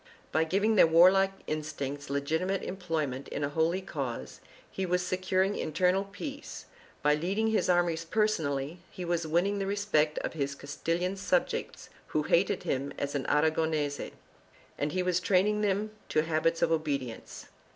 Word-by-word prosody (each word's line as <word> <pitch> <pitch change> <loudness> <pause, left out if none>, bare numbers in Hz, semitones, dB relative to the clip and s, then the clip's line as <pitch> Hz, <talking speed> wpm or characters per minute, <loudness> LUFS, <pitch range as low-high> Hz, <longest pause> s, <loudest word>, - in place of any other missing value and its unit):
By 160 +1 +2
giving 205 +6 +2
their 165 - +8
warlike 185 +4 +6
instincts 145 -2 -4
legitimate 160 +7 -1
employment 160 -8 -3
in 145 - -4
a 145 - 0
holy 160 +5 +1
cause, 120 - -5 0.3
he 190 - -3
was 180 -1 0
securing 185 +2 +1
internal 185 +5 +1
peace; 280 +9 -7 0.4
by 150 - +5
leading 195 +9 0
his 220 -4 +1
armies 175 -2 +2
personally, 165 -6 0
he 180 - -7
was 170 -1 -1
winning 185 +6 +1
the 195 - -2
respect 195 -7 +1
of - - -3
his 140 -3 -2
Castilian 165 +7 -2
subjects 180 -1 -1 0.2
who 155 - 0
hated 175 +5 +2
him 140 +1 -2
as 145 0 -2
an 140 -2 -2
Aragonese, 155 -2 +1 0.7
and 145 +1 -2
he 185 +3 0
was 180 -1 +2
training 200 +3 +2
them 210 +1 0 0.2
to 155 - +2
habits 165 +1 +1
of 165 - +2
obedience. 140 -7 -3
165 Hz, 150 wpm, -30 LUFS, 150-190 Hz, 0.7 s, their